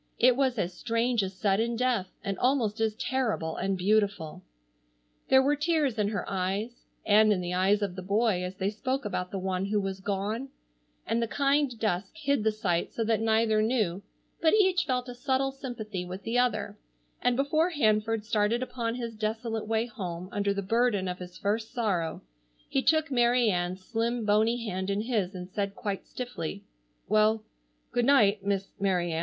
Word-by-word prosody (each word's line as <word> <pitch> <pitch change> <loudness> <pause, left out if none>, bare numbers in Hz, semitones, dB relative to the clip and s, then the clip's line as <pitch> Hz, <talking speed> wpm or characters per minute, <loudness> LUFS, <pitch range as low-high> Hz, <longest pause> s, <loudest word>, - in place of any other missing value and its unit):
It 250 0 +5
was 260 -2 +1
as 180 -3 -1
strange 230 +3 0
as 190 -1 -4
sudden 210 +5 +1
death, 240 -5 +1 0.2
and 200 -2 -2
almost 245 -5 +1
as 220 -1 +1
terrible 225 -10 -1
and 195 0 -1
beautiful. 195 -4 0 0.9
There 265 0 +6
were 290 +2 +3
tears 295 -6 +1
in 205 - +2
her 205 -1 -3
eyes, 195 +5 -3 0.2
and 215 +1 +5
in 200 - +2
the 180 0 -3
eyes 195 +3 +2
of 190 -3 -3
the 185 - -5
boy 200 0 +1
as 180 +1 -5
they 190 +1 -1
spoke 260 +4 -2
about 180 -2 -2
the 195 - -4
one 190 0 -1
who 210 +1 +1
was 195 -1 -3
gone, 205 +6 -2 0.6
and 230 +1 0
the 230 - 0
kind 275 0 +1
dusk 195 -3 -1
hid 280 -7 0
the 220 - +3
sight 190 -6 -1
so 230 - -2
that 225 0 +1
neither 220 -1 +3
knew, 215 -6 0 0.4
but 325 +4 +5
each 375 -4 +3
felt 250 -2 -1
a 245 - -6
subtle 265 +2 0
sympathy 230 -8 -5
with 185 +2 -7
the 235 +2 +1
other, 250 - 0 0.4
and 245 0 +2
before 310 +5 +2
Hanford 220 -7 +1
started 220 +2 +1
upon 235 -2 -3
his 235 -2 -4
desolate 220 +1 -3
way 225 +1 +1
home 185 -6 -6
under 200 0 0
the 200 0 -2
burden 225 -2 +1
of 180 0 -4
his 180 0 -9
first 220 +2 -1
sorrow 190 -9 -1 0.4
he 270 - 0
took 315 +1 +2
Mary 240 -2 +3
Ann's 180 +1 -2
slim 230 +1 -1
bony 220 +3 +2
hand 190 -1 -3
in 200 +1 0
his 210 -5 -1
and 180 -1 -6
said 200 +1 -3
quite 205 -4 -4
stiffly: 205 -6 -5 0.4
"Well, 215 +1 +3 0.5
good 240 -1 +1
night, 215 -7 +4
Miss 195 -1 -1
Mary 180 -3 +1
Ann. 160 - -1
215 Hz, 185 wpm, -28 LUFS, 195-245 Hz, 0.9 s, There